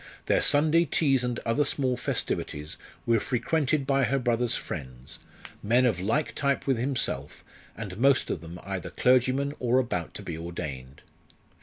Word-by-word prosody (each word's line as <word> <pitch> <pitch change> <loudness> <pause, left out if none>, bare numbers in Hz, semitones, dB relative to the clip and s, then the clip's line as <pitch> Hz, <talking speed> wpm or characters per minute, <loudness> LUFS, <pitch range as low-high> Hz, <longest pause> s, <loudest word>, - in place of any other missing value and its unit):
Their - - +3
Sunday 155 +3 +5
teas 135 -4 +2
and 125 -1 -1
other 115 +6 +2
small 130 -2 0
festivities 75 -10 -3 0.3
were 115 -1 +3
frequented 140 +4 0
by 135 -1 +2
her 135 - +1
brother's 120 -2 +1
friends, 65 -5 -7 0.4
men 120 +4 +3
of 110 -8 +1
like 115 +10 0
type 140 -1 0
with 135 -4 +1
himself, 130 0 -2 0.3
and 100 -4 -6
most 135 +1 +3
of - - -3
them 85 +2 -9
either 95 -2 -4
clergymen 130 +3 +2
or 125 0 +2
about 105 -10 -1
to - - -7
be 85 - -5
ordained. 75 -6 -7
125 Hz, 155 wpm, -27 LUFS, 90-135 Hz, 0.4 s, Sunday